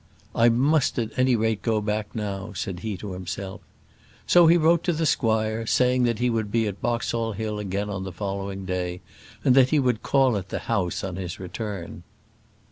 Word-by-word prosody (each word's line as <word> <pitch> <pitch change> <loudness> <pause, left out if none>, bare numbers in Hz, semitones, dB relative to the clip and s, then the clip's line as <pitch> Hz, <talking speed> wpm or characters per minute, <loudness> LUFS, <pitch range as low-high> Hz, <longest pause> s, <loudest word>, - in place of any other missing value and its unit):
"I 115 +1 +5
must 135 +5 +2
at 115 -3 -1
any 130 0 +3
rate 110 -1 0
go 110 -2 +1
back 105 +1 -3
now," 100 -1 -4
said 90 -1 -4
he 105 0 -4
to 100 +1 -7
himself. 95 +1 -6 0.6
So 175 -2 +6
he 170 +2 +6
wrote 165 +1 +3
to 175 - +2
the 160 +1 -1
squire, 110 -4 +1
saying 125 +1 +3
that 115 -2 0
he 125 - +1
was 115 -2 0
to - - -10
be 115 +1 +1
at 100 -2 -5
Boxall 115 -1 -1
Hill 105 0 -3
again 100 0 -2
on 95 -2 -4
the 95 - -5
following 95 +1 -4
day, 90 -1 -3 0.4
and 130 - +6
that 130 -1 +6
he 155 - +3
would 125 -5 +1
call 135 -5 +3
at 95 -1 -6
the - - -3
house 95 -7 -1
on 95 -2 -4
his 90 -3 -5
return. 95 -1 -6
110 Hz, 205 wpm, -25 LUFS, 95-120 Hz, 0.6 s, So